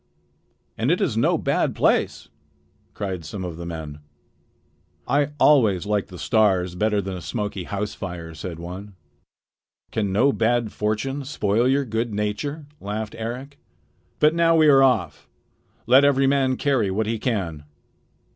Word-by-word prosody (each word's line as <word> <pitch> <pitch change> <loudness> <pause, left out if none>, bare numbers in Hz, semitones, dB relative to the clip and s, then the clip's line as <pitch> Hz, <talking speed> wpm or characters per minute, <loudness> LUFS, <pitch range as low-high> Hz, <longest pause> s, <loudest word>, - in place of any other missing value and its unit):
"And - - +1
it - - +2
is - - 0
no - - +2
bad - - 0
place," - - +1 0.7
cried 95 -4 -4
some 95 +5 -6
of 85 -3 -6
the 85 0 -6
men. 80 -3 -7 1.1
"I 145 0 +2
always 110 - +4
liked 105 -1 0
the 90 - -11
stars 95 -5 +2
better 105 +2 +1
than 95 0 -4
a 90 - -7
smoky 100 +2 -4
house 105 0 -3
fire," 85 -3 -7
said 85 +2 -7
one. 95 +4 -8 1.0
"Can 105 -3 -1
no 130 +8 +3
bad 115 -1 +1
fortune 110 +7 -2
spoil 115 -3 0
your 135 +1 +2
good 115 -1 -2
nature?" 105 +9 -3
laughed 105 +1 -4
Eric. 125 +5 -6 0.6
"But 150 +1 +4
now 165 0 +3
we 155 -1 +5
are 135 -1 +6
off. 130 -2 +1 0.6
Let 130 +4 +6
every 135 -1 +4
man 135 -2 +2
carry 130 -8 +1
what 105 +4 -1
he 110 +1 -2
can." 95 - -2
105 Hz, 150 wpm, -23 LUFS, 95-135 Hz, 1.1 s, are